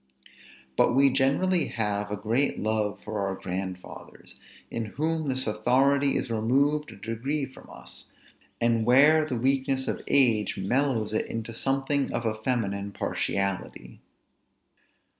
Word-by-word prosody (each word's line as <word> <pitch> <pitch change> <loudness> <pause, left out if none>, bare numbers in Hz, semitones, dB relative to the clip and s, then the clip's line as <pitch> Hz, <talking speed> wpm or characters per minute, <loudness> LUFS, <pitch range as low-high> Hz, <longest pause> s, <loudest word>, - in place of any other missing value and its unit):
But 120 - +3
we 135 0 +5
generally 140 +6 +2
have 105 -2 -2
a 105 - -2
great 115 +7 0
love 110 -1 -1
for 110 -1 -3
our 95 -1 -1
grandfathers, 95 0 -7 0.3
in 115 -1 -3
whom 155 +6 -2
this 130 0 -2
authority 135 +6 +2
is 120 - -3
removed 140 +7 +1
a - - -11
degree 135 +6 -3
from 130 - -15
us, - - -11 0.5
and 115 -1 +2
where 145 +6 +5
the 130 -5 -3
weakness 130 +1 0
of - - -2
age 115 -7 +2
mellows 110 +1 0
it 110 - 0
into 115 0 -5
something 135 +3 0
of 120 0 -2
a 110 - +1
feminine 100 -5 -1
partiality. 95 -15 -3
120 Hz, 135 wpm, -27 LUFS, 105-140 Hz, 0.5 s, we